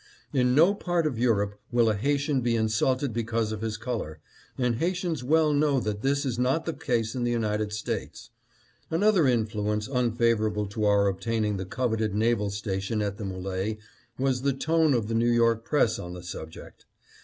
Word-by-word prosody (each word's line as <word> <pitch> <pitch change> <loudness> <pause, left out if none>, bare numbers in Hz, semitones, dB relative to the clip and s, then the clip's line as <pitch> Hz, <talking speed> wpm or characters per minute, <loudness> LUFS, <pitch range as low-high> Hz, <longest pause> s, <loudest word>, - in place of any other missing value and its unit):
In 125 -2 +2
no 170 +7 +6
part 175 -4 -1
of 135 -7 -1
Europe 105 -4 +1
will 120 -1 +3
a 110 - +3
Haitian 140 +5 0
be 120 -1 +1
insulted 115 +4 +1
because 115 -1 -1
of 110 -1 -5
his 110 -1 -3
color, 110 -10 -4 0.4
and 125 -3 0
Haitians 175 -2 -1
well 155 +3 +3
know 145 -2 +2
that 105 -3 -3
this 140 +2 +1
is 125 -3 -2
not 135 +6 +1
the 165 - -2
case 120 -6 -1
in 125 - -2
the 120 - +1
United 110 -3 -1
States. 105 0 -5 0.3
" - - -35
Another 185 -2 +3
influence 105 -3 0
unfavorable 115 -4 +1
to 105 +2 -3
our 100 -1 +4
obtaining 105 +1 -1
the 95 - -4
coveted 110 0 -1
naval 110 -1 +1
station 100 +1 -3
at 100 -1 -2
the 110 - -6
M61e 95 +2 -3 0.4
was 130 -1 0
the 140 0 +1
tone 160 +1 +2
of 115 -3 -1
the 115 - -3
New 115 +1 +2
York 115 -1 +3
press 120 -6 +2
on 90 0 -6
the 90 - -9
subject. 80 -2 -9
115 Hz, 185 wpm, -27 LUFS, 105-135 Hz, 0.4 s, no